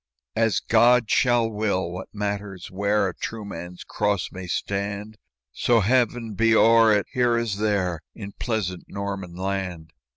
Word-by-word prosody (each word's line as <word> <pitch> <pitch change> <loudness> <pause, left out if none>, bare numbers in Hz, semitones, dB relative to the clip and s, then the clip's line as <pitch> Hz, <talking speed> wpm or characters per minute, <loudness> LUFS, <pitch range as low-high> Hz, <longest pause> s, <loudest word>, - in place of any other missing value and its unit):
"As 115 -1 +2
God 120 0 +4
shall 120 -2 +3
will! 105 -5 -1
what 90 +1 -6
matters 100 -3 -4
where 100 +1 +1
A 90 - -4
true 110 +3 -6
man's 90 -2 -8
cross 105 -3 -1
may 95 -1 -7
stand, 100 +3 -3 0.3
So 115 - +2
Heaven 120 0 +1
be 115 +2 +3
o'er 115 0 +6
it 105 -1 +2
here 120 -2 +2
as 115 -4 -1
there 95 -6 0
In 100 -3 -7
pleasant 100 -7 -2
Norman 100 -3 -5
land? 90 -4 -4
105 Hz, 150 wpm, -24 LUFS, 95-115 Hz, 0.3 s, o'er